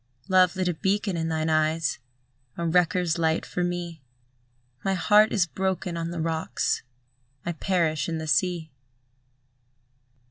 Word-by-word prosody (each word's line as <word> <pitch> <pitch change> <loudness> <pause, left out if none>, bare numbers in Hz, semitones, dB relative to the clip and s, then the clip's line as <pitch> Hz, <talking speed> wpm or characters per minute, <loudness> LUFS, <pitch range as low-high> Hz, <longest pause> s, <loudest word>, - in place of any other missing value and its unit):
Love 185 -1 +4
lit 185 -1 0
a 175 - +1
beacon 195 +3 0
in 165 -1 -1
thine 160 0 -1
eyes, 155 -1 +1 0.6
A 170 - -2
wreckers' 175 0 +2
light 160 0 +1
for 180 - -2
me; 175 -3 -3 0.8
My 195 0 +1
heart 210 +3 +5
is 195 -5 +3
broken 190 0 -2
on 165 0 -3
the 170 0 -5
rocks; 160 0 -1 0.6
I 175 - -1
perish 165 -3 0
in 165 - -2
the 160 - -4
sea. 170 -1 0
170 Hz, 140 wpm, -26 LUFS, 160-185 Hz, 0.8 s, heart